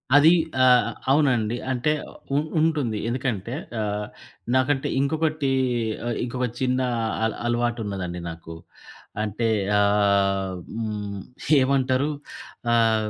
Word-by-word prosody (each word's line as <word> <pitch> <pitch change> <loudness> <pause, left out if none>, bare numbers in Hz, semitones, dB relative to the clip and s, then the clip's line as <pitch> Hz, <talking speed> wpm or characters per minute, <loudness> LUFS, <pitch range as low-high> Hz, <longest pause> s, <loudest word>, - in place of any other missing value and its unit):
అది 150 +3 +8 0.3
ఆహ్, 125 -1 +5 0.2
అవునండి. 125 -6 +2
అంటే 130 +4 +1 0.4
ఉ - - +4 0.2
ఉంటుంది. 150 -9 +1
ఎందుకంటే 120 -3 -2 0.3
ఆహ్, 105 0 -2 0.5
నాకంటే 135 +1 +2
ఇంకొకటి 155 -1 0 0.6
ఆహ్, 120 - -1
ఇంకొక 125 +1 -2
చిన్న 130 0 +1 0.4
అల 110 - +2 0.2
అలవాటు 120 0 0
ఉన్నదండి 90 -3 -4
నాకు. 80 0 -9 0.7
అంటే 110 +2 -1 0.3
ఆహ్, 100 -2 +2 0.2
హ్మ్ 105 -3 -4 0.4
ఏవంటారు? 130 +1 +2 0.6
ఆహ్, 110 -2 +3
120 Hz, 100 wpm, -24 LUFS, 105-130 Hz, 0.7 s, అది